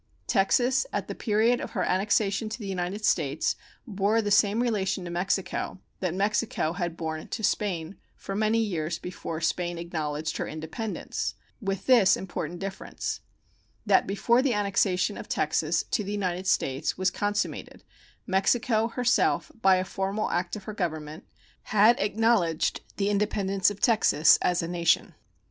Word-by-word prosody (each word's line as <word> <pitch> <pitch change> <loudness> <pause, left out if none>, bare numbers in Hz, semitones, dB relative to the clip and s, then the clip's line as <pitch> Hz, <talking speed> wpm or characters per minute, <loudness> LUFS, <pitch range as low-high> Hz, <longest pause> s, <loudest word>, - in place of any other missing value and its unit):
Texas 245 - +2
at - - -2
the - - -4
period 225 +2 +2
of - - -6
her - - 0
annexation 200 +2 +1
to 220 - -5
the 220 - -8
United 190 +2 -3
States 150 -2 +1 0.3
bore 205 0 +1
the 205 -2 -1
same 205 +2 +4
relation 195 -5 -1
to 175 - -5
Mexico 185 +1 -2 0.2
that 180 -2 -2
Mexico 200 -4 0
had 175 -2 -3
borne 160 -1 -4
to 220 - -5
Spain 190 -4 -1 0.2
for 195 - -7
many 215 +2 +2
years 170 -7 -1
before 165 -2 -6
Spain 175 +1 -1
acknowledged 155 -2 -3
her - - -3
independence, 160 +8 -4 0.3
with 195 -2 -3
this 240 -7 +5
important 175 -2 -5
difference, 195 +1 -5 0.7
that - - +4
before 235 +5 +2
the 260 -4 +1
annexation 200 -1 +1
of - - -9
Texas 155 +2 +1
to 210 - +1
the 200 - -5
United 185 -2 -2
States 135 -5 0
was 185 -1 +1
consummated 205 +1 -3 0.4
Mexico 220 +4 +2
herself, 240 +1 +1
by 190 -2 +6
a 185 0 0
formal 195 +3 -2
act 175 +2 -1
of 210 - -8
her 215 - -6
Government, 160 -4 -4 0.4
had 215 +3 +4
acknowledged 205 -6 +1 0.2
the 200 0 +1
independence 200 -2 +1
of 205 -1 -7
Texas 205 - +5
as 175 -1 +1
a - - -3
nation. 170 -1 +1
195 Hz, 155 wpm, -27 LUFS, 175-215 Hz, 0.7 s, by